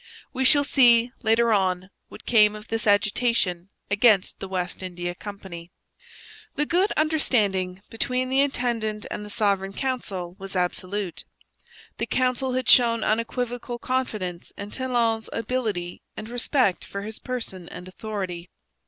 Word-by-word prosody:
We 265 0 0
shall 285 +2 +6
see, 245 -4 +5
later 230 0 +3
on, 185 -1 0 0.2
what - - -12
came 215 -3 +5
of 210 0 -11
this 225 0 -2
agitation 205 -3 +2 0.2
against 205 -2 +4
the 195 - -5
West 180 -1 -3
India 175 -1 -4
Company. 185 -3 -9 0.9
The 295 - +1
good 365 +6 +2
understanding 205 - +1
between 250 +3 -1
the 265 +1 +1
intendant 235 -6 -1
and 210 - -4
the 210 - -8
Sovereign 200 -2 0
Council 195 -9 -3
was 195 0 -8
absolute. 185 +1 -2 0.7
The - - -1
council 255 0 +1
had 255 -1 -1
shown 235 -2 +5
unequivocal 240 +2 -1
confidence 215 -9 -3
in 200 +1 -7
Talon's 235 -4 0
ability 215 -7 -2 0.2
and 215 - -6
respect 245 - +1
for 200 0 -6
his 215 +1 -6
person 225 -8 -5
and 180 0 -9
authority. 185 -3 -5
215 Hz, 135 wpm, -25 LUFS, 190-245 Hz, 0.9 s, shall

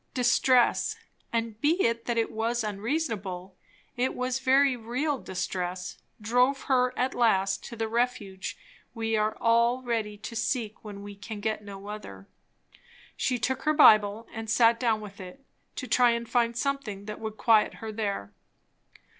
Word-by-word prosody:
Distress, 250 0 +3 0.4
and 230 -2 -2
be 300 +2 +4
it 230 0 0
that 240 -1 -1
it 225 - +1
was 230 +1 -1
unreasonable, 205 - -3 0.4
it 250 +2 0
was 255 +1 -1
very 265 0 +4
real 250 +5 -2
distress, 180 -2 -4 0.2
drove 250 +5 +2
her 255 -2 +2
at 255 +1 0
last 195 -5 +2
to 235 - -8
the 225 -1 -2
refuge 220 -5 -2 0.4
we 225 -1 -1
all 230 +3 +2
are 260 - -13
ready 220 -4 -2
to 215 +3 -8
seek 225 -1 -2
when 205 -2 -8
we 205 0 -8
can 210 +1 -7
get 215 0 -2
no 200 -1 -9
other. 200 - -8 0.9
She 250 - 0
took 255 +3 -1
her 305 - +2
Bible 215 -6 +6
and 225 0 -6
sat 230 0 +4
down 225 -3 +1
with 205 +1 -10
it, 190 +10 -11 0.3
to 255 - -5
try 245 -2 +4
to 235 - -6
find 235 0 +1
something 240 -7 -2
that 210 0 -6
would 220 -1 -6
quiet 220 -2 +3
her 220 -1 -6
there. 200 - -3
225 Hz, 160 wpm, -28 LUFS, 210-245 Hz, 0.9 s, Bible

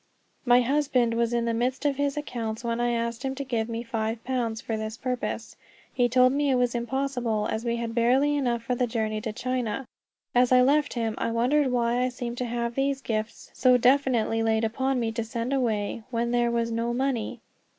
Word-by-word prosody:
My 245 0 +6
husband 255 -3 +1
was 235 0 +1
in 235 -1 0
the 230 - 0
midst 250 +5 -1
of 280 -2 +1
his 285 0 0
accounts 235 -6 -4
when 235 0 -1
I 240 - +2
asked 235 0 -2
him 265 0 -3
to 280 - -4
give 235 -4 -2
me 230 0 -3
five 225 -1 -3
pounds 240 -3 -2
for 225 - -3
this 220 +1 -4
purpose. 250 -3 -3 0.4
He 245 -1 +2
told 255 +1 +5
me 285 0 +1
it 265 - +3
was 245 -1 +1
impossible, 240 -3 -1
as 220 - -2
we 235 -1 0
had 235 -1 -3
barely 255 +5 +3
enough 240 -5 0
for 250 - -1
the 245 0 0
journey 220 -2 -2
to 220 0 -3
China. 255 +1 -2 0.5
As 245 0 +4
I 250 0 +7
left 290 +3 +2
him 230 -2 -1
I - - 0
wondered 255 +6 +2
why 240 0 +1
I 255 - +1
seemed 245 -1 -5
to 250 - -1
have 235 0 -2
these 275 +1 0
gifts 220 -3 -4
so 250 -1 +4
definitely 245 -3 +2
laid 225 0 +1
upon 260 +4 0
me 230 -1 -1
to 230 0 -2
send 235 +3 -3
away, 225 -5 -1
when 235 -1 -1
there 240 -1 +2
was 235 0 0
no 230 +1 -1
money. 260 -4 -1
240 Hz, 215 wpm, -26 LUFS, 230-255 Hz, 0.5 s, I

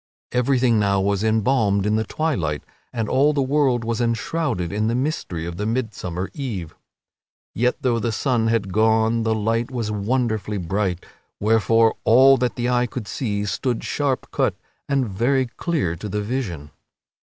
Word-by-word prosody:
Everything 125 -2 +2
now 100 -1 +2
was 100 +1 0
embalmed 110 -2 +2
in 105 +1 +2
the 110 - +1
twilight, 100 - -2 0.3
and 115 -3 -2
all 145 +6 +3
the 145 - +1
world 130 -3 +2
was 115 +1 -2
enshrouded 115 - -1
in 105 +1 0
the 115 - 0
mystery 125 - -2
of 85 0 -6
the 105 - -2
midsummer 105 -6 -3
eve. 105 - -5 0.8
Yet 125 +3 +1
though 120 -3 +2
the 115 +1 -1
sun 115 0 0
had 110 -5 0
gone 110 +2 +3
the 110 0 +1
light 115 +2 0
was 120 -5 -3
wonderfully 110 0 -1
bright, 95 0 -2 0.3
wherefore 115 +1 +3
all 130 +4 +7
that 125 0 -1
the 120 0 -1
eye 125 0 +2
could 115 -2 -6
see 105 -4 -2
stood 120 +4 -2
sharp 140 -3 -1
cut - - +1 0.3
and 135 -3 +1
very 125 +7 +1
clear 125 - -2
to 105 - -6
the 105 +2 -2
vision. 100 - -4
115 Hz, 165 wpm, -22 LUFS, 100-125 Hz, 0.8 s, all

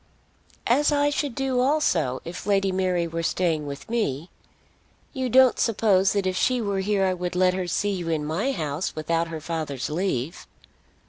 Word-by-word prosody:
"As 290 +6 +3
I 290 0 +2
should 285 -4 -2
do 265 -2 0
also, 215 - +1
if 175 +3 -7
Lady 195 -1 +2
Mary 185 -2 0
were 165 0 -3
staying 165 -3 0
with 140 0 -7
me. 185 - -2 0.8
You 260 -1 -2
don't 260 +1 +5
suppose 200 -4 +3
that 200 -2 0
if 185 0 0
she 250 +6 +1
were 200 -4 -1
here 195 0 +1
I 185 - +1
would 180 -1 -4
let 180 0 +3
her 185 -1 -3
see 205 +4 0
you 175 -4 -3
in 155 -2 -1
my 175 - -1
house 155 - -3
without 165 +2 -1
her 165 -1 -6
father's 155 -5 -4
leave?" 165 - -2
185 Hz, 180 wpm, -25 LUFS, 165-225 Hz, 0.8 s, don't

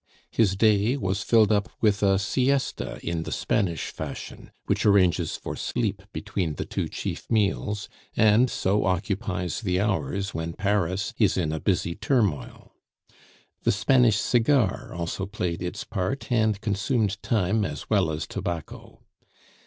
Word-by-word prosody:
His 100 -4 +2
day 110 +4 +3
was 95 -4 -1
filled 110 -2 +4
up 105 0 +1
with 105 -2 +2
a 95 -1 +4
siesta 130 +7 0
in 85 -1 -2
the - - -6
Spanish 85 -6 -1
fashion, - - -7 0.2
which - - 0
arranges 95 -5 +3
for - - -6
sleep 105 -6 -2
between 95 -7 -3
the - - -4
two - - -2
chief - - -5
meals, 105 -1 0 0.3
and 110 +4 +5
so 100 -1 +1
occupies 95 -1 -1
the 90 -4 0
hours 100 -1 -1
when 80 0 -3
Paris 100 +1 0
is 105 -5 +3
in 80 -4 0
a 80 - -2
busy 90 -2 0
turmoil. 110 - -1 0.9
The - - +2
Spanish 125 -6 +4
cigar 120 -2 +2
also 85 +3 -3
played 90 -4 -3
its 90 +3 -4
part, 110 +8 -3
and 110 -4 +2
consumed 105 0 0
time 105 0 +1
as - - -4
well 100 -6 +2
as 80 -1 -3
tobacco. 85 -3 -6
100 Hz, 145 wpm, -26 LUFS, 90-110 Hz, 0.9 s, and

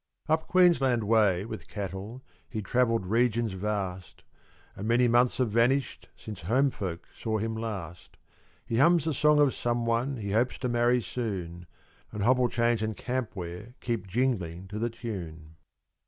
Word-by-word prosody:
Up 160 0 +1
Queensland 150 -10 +4
way 105 -4 +3
with - - -7
cattle 100 +5 -6 0.3
He 110 -3 -4
travelled 115 -3 +1
regions 115 +2 +1
vast; 95 -2 -4 0.5
And 100 - -5
many 120 +2 +4
months 120 +1 +3
have 125 -4 +1
vanished 120 +4 +1
Since 110 -1 -8
home 130 +10 +2
folk 90 -6 -5
saw 110 -1 -2
him 110 +1 -2
last. 95 -7 -6 0.5
He 115 - -2
hums 170 +1 +5
a 160 - 0
song 150 +3 +4
of 145 -3 +4
someone 120 +2 0
He 100 -3 -4
hopes 120 +4 +1
to 130 - -2
marry 120 0 +2
soon; 90 -9 -5 0.4
And 105 - -3
hobble 125 +1 +3
chains 115 -1 +1
and 110 -1 -2
camp 125 -3 -3
ware 90 +6 -7
Keep 115 -6 -3
jingling 95 -6 -1
to 105 +1 -5
the 120 +1 0
tune. 85 -9 -7
115 Hz, 155 wpm, -28 LUFS, 100-125 Hz, 0.5 s, hums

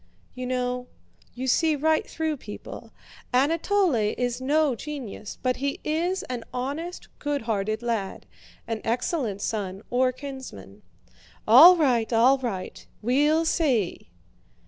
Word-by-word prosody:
"You 255 0 -5
know, 250 0 -2 0.5
you 255 +1 -4
see 310 +4 +3
right 315 +2 +1
through 315 -2 -2
people. 210 -5 -9 0.4
Anatole 330 +7 +2 0.2
is 245 0 -2
no 295 +1 +2
genius, 245 -6 -7
but 255 -1 +1
he 275 +1 -2
is 345 +5 -1
an 245 -2 -5
honest, 290 +8 -4
goodhearted 225 -6 -2
lad; 225 -5 -3 0.4
an 225 -2 -4
excellent 230 - -1
son 200 -2 -3
or 255 +1 +3
kinsman." 265 0 -9 0.7
"All 315 +11 +9
right, 250 -8 +2
all 245 +4 +5
right, 215 -8 -5 0.2
we'll 295 +7 +3
see!" 255 - 0
255 Hz, 120 wpm, -25 LUFS, 230-300 Hz, 0.7 s, All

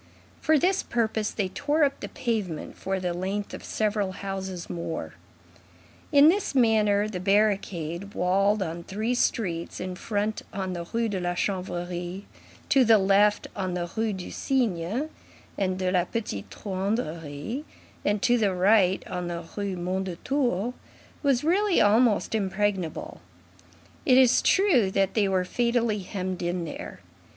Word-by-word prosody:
For 315 0 +4
this 370 +5 +2
purpose, 220 -2 -1
they 195 -4 -2
tore 295 +8 +1
up 275 -1 +1
the - - -6
pavement 210 -10 -3
for 190 0 -2
the 180 -1 -2
length 195 +3 -3
of - - -7
several 205 -3 -1
houses 190 -2 -5
more. 170 -1 -4 1.0
In 285 0 +7
this 370 -3 +2
manner, 215 -4 +3
the 200 -4 -4
barricade, 195 -2 0
walled 195 +3 +2
on 170 -1 -5
three 215 +7 -2
streets, 180 -9 -1
in 185 0 -4
front 205 +3 -2
on 190 -1 -3
the 170 -1 -5
Rue 230 0 +1
de 200 -3 -2
la 175 0 -1
Chanvrerie, 180 0 -3 0.4
to 275 -3 +5
the 225 -2 +6
left 200 +1 +3
on 185 -3 -2
the 175 -1 -3
Rues 220 -2 0
du 185 - -7
Cygne 235 - -1 0.5
and 185 -2 -1
de 185 -1 0
la 180 -2 +2
Petite 180 - -4
Truanderie, 190 - -3 0.6
to 245 - +4
the 200 -4 +1
right 190 0 +3
on 180 -1 -4
the 170 -1 -5
Rue 200 -2 -2
Mondétour, 190 +6 -1 0.5
was 275 -3 +2
really 375 +4 +3
almost 215 +1 +3
impregnable; 195 - -1 0.9
it 255 - +6
is 255 -2 +6
true 330 - +4
that 195 0 +1
they 210 -3 +2
were 185 -1 +1
fatally 235 0 +1
hemmed 185 -1 -4
in 175 0 -1
there. 155 - -7
200 Hz, 145 wpm, -26 LUFS, 180-225 Hz, 1.0 s, In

